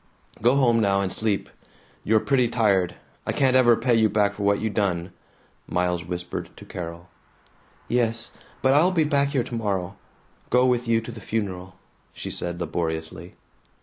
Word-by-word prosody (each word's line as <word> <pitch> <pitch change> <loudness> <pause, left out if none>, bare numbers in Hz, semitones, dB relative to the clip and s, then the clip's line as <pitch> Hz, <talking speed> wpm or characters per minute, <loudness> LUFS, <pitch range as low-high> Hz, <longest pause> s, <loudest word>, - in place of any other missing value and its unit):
"Go 120 +4 +4
home 120 -4 +4
now 100 -2 +2
and 95 -1 -1
sleep. 110 -3 -1 0.6
You're 110 +1 +3
pretty 125 0 +2
tired. 100 -7 +1 0.3
I - - +1
can't 130 -2 +2
ever 120 -2 +6
pay 120 +2 +1
you 110 -1 +4
back 100 -1 +2
for 100 - -8
what 100 0 +2
you 110 - -1
done," 95 -4 -1 0.6
Miles 90 -1 0
whispered 90 0 -5
to - - -11
Carol. 85 0 -7 0.8
"Yes. 115 -1 0 0.3
But 130 0 +5
I'll 160 +6 +4
be 165 -4 +2
back 140 -2 +2
here 140 -3 0
tomorrow. 100 -6 -3 0.5
Go 125 +1 +4
with 125 -1 +1
you 115 -1 +3
to 115 - -8
the 110 -2 -10
funeral," 95 -3 -4 0.4
she - - -6
said 85 0 -4
laboriously. 80 0 -4
110 Hz, 165 wpm, -24 LUFS, 90-120 Hz, 0.8 s, ever